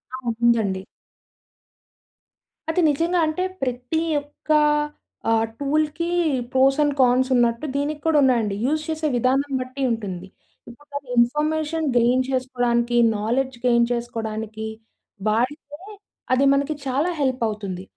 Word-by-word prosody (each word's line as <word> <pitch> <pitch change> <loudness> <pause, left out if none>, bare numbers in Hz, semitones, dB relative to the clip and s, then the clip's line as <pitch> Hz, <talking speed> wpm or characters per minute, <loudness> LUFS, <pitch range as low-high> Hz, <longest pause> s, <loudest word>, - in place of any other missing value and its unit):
ఆ! 255 -2 -3
ఉందండి. 220 -5 +2 1.9
అది 325 +3 +1
నిజంగా 335 +5 +1
అంటే, 310 +4 -1 0.2
ప్రతి 250 +5 -2 0.2
యొక్క 290 +2 -6 0.8
ఆహ్, 225 0 +3
టూల్‌కి, 305 +4 0 0.4
ప్రోస్ 270 +1 +3
అండ్ 290 -1 +2
కాన్స్ 255 0 +4
ఉన్నట్టు, 235 +2 +2
దీనికి 295 +1 -2
కూడా 320 -2 +3
ఉన్నాయండి. 230 -6 +2
యూజ్ 310 +3 0
చేసే 315 -1 -1
విధానం 265 +4 +1
బట్టి 255 +2 -7
ఉంటుంది. 190 -5 -4 0.4
ఇప్పుడు 290 +5 -16
నాకు 285 -1 -5
ఇన్ఫర్మేషన్ 305 +5 +1
గెయిన్ 245 +2 +3
చేసుకోడానికి, 245 -2 0 0.2
నాలెడ్జ్ 245 +5 -1
గెయిన్ 235 -1 +4
చేసుకోడానికి, 220 -2 -4 0.6
వాడితే, 265 +7 -1 0.5
అది 265 +2 +3
మనకి 280 +2 0
చాలా 275 +6 0
హెల్పవుతుంది. 215 -8 -2
255 Hz, 115 wpm, -23 LUFS, 235-295 Hz, 1.9 s, కాన్స్